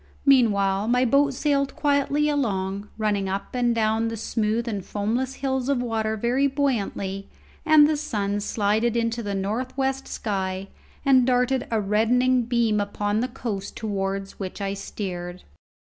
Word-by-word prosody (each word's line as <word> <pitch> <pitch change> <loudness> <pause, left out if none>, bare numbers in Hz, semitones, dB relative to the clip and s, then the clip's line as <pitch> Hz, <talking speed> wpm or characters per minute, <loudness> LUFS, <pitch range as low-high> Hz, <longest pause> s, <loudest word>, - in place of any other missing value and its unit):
Meanwhile 205 -7 +3
my 250 +2 +3
boat 275 +2 +3
sailed 280 -1 0
quietly 290 0 +1
along, 200 -8 -1
running 205 -3 0
up 195 +1 -4
and 240 -2 +1
down 220 0 +1
the 225 0 -4
smooth 225 +2 -1
and 205 -4 -3
foamless 235 +8 -2
hills 265 -1 -2
of 275 -3 +2
water 220 -2 -1
very 245 +6 +2
buoyantly, 210 -8 -2 0.4
and 305 -1 +7
the 310 - +1
sun 205 -9 -2
slided 215 +3 0
into 230 0 0
the 205 -2 -3
north 220 +7 -3
west 270 0 -1
sky 190 -2 -3 0.4
and 260 -2 +5
darted 250 +1 +1
a 225 - +1
reddening 235 +5 +2
beam 230 -3 +1
upon 205 +1 -1
the 250 - 0
coast 225 -6 -5
towards 195 -2 -3
which 190 0 -5
I 195 -1 -2
steered. 180 -3 -6
225 Hz, 150 wpm, -24 LUFS, 200-255 Hz, 0.4 s, and